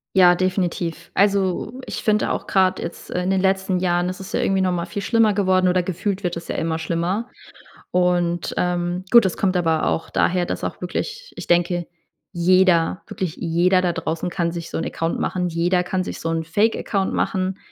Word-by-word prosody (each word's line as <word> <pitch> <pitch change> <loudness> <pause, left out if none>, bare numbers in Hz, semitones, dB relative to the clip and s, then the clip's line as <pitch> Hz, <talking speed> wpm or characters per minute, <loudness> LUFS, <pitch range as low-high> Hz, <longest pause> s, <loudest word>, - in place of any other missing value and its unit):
Ja, 180 -2 +7
definitiv. 180 -2 -2
Also, 200 +2 +1
ich - - -5
finde 215 -1 +2
auch - - -3
grad 190 -1 +2
jetzt 170 - -7
in 180 +1 -1
den 190 - +2
letzten 190 -1 +1
Jahren 175 0 +1
ist 185 - -6
es 190 - -8
ja - - 0
irgendwie 195 0 +1
nochmal 180 -2 0
viel 175 +4 -5
schlimmer 225 -1 +3
geworden 185 -2 +2
oder 180 0 +3
gefühlt 190 +2 -3
wird 175 -1 -1
es 170 - -8
ja - - -2
immer 160 0 -1
schlimmer. 170 +8 -2 0.6
Und, 175 -1 +1
ähm, 175 +1 -1
gut, 235 -2 +8
das 190 - -1
kommt 190 -2 +1
aber 165 -3 +1
auch 165 - -1
daher, 180 -1 +1
dass - - -4
auch - - -5
wirklich 445 - -4
ich - - -7
denke, 175 0 +1 0.5
jeder, 180 0 +3
wirklich 180 -5 -4
jeder 180 +2 +2
da 175 -1 0
draußen 165 +1 -3
kann 170 -1 -1
sich 170 -1 -6
so - - -4
'n - - -2
Account 165 0 -2
machen. 180 -1 -1
Jeder 175 +2 +1
kann 185 0 -1
sich - - -6
so - - -4
'n 165 0 -1
Fake 205 +8 +1
Account. 195 -2 -1
machen. 190 0 -1
180 Hz, 200 wpm, -22 LUFS, 170-190 Hz, 0.6 s, gut